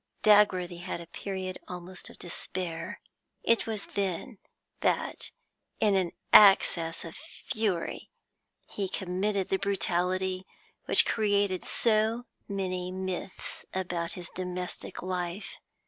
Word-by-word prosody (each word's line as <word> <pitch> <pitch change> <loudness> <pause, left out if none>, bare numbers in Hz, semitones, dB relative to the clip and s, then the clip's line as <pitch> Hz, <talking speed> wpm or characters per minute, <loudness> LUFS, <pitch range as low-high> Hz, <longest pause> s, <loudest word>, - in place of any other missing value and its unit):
Dagworthy 185 -4 +5
had 175 0 -4
a 170 - -8
period 185 +1 -5
almost 180 0 -7
of - - -13
despair; 170 -1 -5 0.4
it 230 -1 +3
was 215 -2 -3
then 200 +4 -2 0.4
that, - - 0 0.5
in 210 -2 +4
an 185 -3 +1 0.2
access 175 -5 +7
of 165 - -8
fury, 205 -6 -3 0.6
he 195 -2 -3
committed 190 +2 -1
the 190 - +2
brutality 185 -1 0 0.4
which - - +7
created 205 -3 +2
so 225 +1 +2 0.2
many 185 -2 -2
myths 185 0 -5
about 175 -2 -2
his 175 -2 -8
domestic 180 0 -5
life. 180 +1 -3
185 Hz, 110 wpm, -29 LUFS, 180-200 Hz, 0.6 s, access